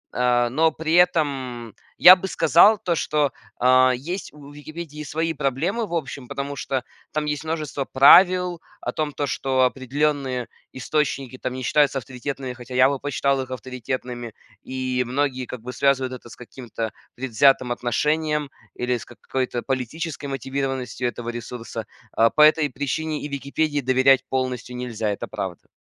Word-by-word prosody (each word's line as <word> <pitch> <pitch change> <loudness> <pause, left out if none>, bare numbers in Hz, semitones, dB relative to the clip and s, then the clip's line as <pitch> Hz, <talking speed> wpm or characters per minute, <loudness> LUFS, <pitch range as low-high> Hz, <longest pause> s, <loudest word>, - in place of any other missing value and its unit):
а, 120 -1 +2
но 160 +5 +3
при 160 0 -3
этом 135 - +1 0.2
я 185 - +10
бы 190 +1 -5
сказал 175 +5 +5
то, 180 -3 -1
что, 150 -3 0 0.3
а, 130 +1 +5
есть 170 +10 -5
у 145 -1 -13
"Википедии" 150 +1 -8
свои 160 +3 -2
проблемы, 160 - -1
в 175 - -8
общем, 140 -5 -4
потому 140 +2 -4
что 135 -1 -2 0.3
там 155 0 -1
есть 150 -1 -2
множество 155 -3 -3
правил 180 +6 +6 0.2
о - - -3
том, 155 -1 -2
то 145 - -2
что 130 -1 0
определенные 135 0 -1 0.2
источники 135 -1 -2
там 125 - -3
не 130 0 -5
считаются 145 +2 +3
авторитетными, 130 +1 -5
хотя 125 +1 -9
я 130 +1 +6
бы 140 -1 -2
посчитал 140 -1 0
их 130 - -7
авторитетными, 125 -2 -5 0.3
и 130 -1 -2
многие 130 0 -1
как 125 - -7
бы 125 +1 -6
связывают 135 0 +1
это 125 -1 -10
с - - -11
каким-то 115 -3 -6 0.2
предвзятым 130 +1 +3
отношением 150 +4 0 0.2
или 125 0 -1
с - - -10
какой-то 125 0 -4
политической 140 +4 -3
мотивированностью 135 -2 -3
этого 120 -1 -5
ресурса. 115 -2 -6 0.3
А, 115 +1 +5
по 150 - +1
этой 155 0 +6
причине 150 +4 -3
и - - -3
"Википедии" 145 +1 -1
доверять 130 +1 +4
полностью 130 -2 -2
нельзя, 115 -3 -3
это 100 - -4
правда. 90 -3 -6
135 Hz, 155 wpm, -23 LUFS, 125-150 Hz, 0.3 s, я